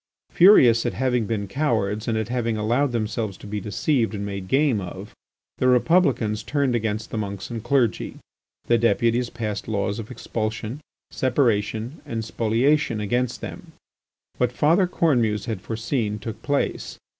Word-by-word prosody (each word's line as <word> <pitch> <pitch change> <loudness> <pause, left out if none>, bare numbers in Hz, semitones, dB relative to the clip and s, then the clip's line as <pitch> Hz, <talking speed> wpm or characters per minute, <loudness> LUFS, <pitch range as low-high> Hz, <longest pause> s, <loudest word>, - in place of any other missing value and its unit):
Furious 125 - +6
at - - -2
having 125 -4 0
been 100 -2 -2
cowards 110 -5 -1
and 115 -2 0
at 110 +1 -2
having 115 -3 -1
allowed 120 +6 +1
themselves 110 -3 -2
to - - -13
be 105 0 -4
deceived 115 +3 0
and 100 0 -4
made 100 -2 -5
game 135 -3 +2
of, 95 +2 -8 0.5
the 130 - +2
Republicans 125 -5 +3
turned 140 -3 0
against 110 -1 -2
the 110 - -2
monks 100 0 -5
and 115 -2 -5
clergy. 120 -2 0 0.5
The 120 -1 +3
deputies 120 +1 +2
passed 110 -4 -4
laws 100 -1 -1
of 110 - -7
expulsion, 115 +1 -4 0.3
separation, 120 0 0
and 115 -6 -4
spoliation 115 +3 +1
against 120 +4 -1
them. - - -8 0.7
What 125 -1 +2
Father 165 +8 +3
Cornemuse 120 - +1
had 110 -6 -4
foreseen 115 -1 -2
took 110 +1 -7
place. 145 +2 -2
115 Hz, 150 wpm, -23 LUFS, 105-125 Hz, 0.7 s, Furious